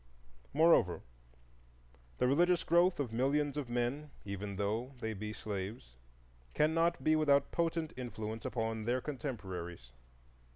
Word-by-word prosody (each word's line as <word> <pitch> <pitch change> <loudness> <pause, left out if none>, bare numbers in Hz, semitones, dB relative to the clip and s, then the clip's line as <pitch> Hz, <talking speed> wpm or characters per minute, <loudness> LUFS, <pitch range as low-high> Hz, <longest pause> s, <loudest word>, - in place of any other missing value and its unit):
Moreover, 155 - +4 1.1
the - - +2
religious 175 +6 +3
growth 175 +1 +4
of 125 -6 -2
millions 140 +4 +1
of 145 -4 -3
men, 125 +5 -1 0.2
even 100 0 -4
though 110 +7 -2
they 110 -2 -2
be 105 +1 -5
slaves, 100 - -5 0.6
cannot 165 +2 +2
be 155 - +4
without 140 -3 +3
potent 165 -2 -1
influence 115 -3 -5
upon 110 -2 -2
their 125 +2 +1
contemporaries. 95 - -5
125 Hz, 120 wpm, -34 LUFS, 105-150 Hz, 1.1 s, Moreover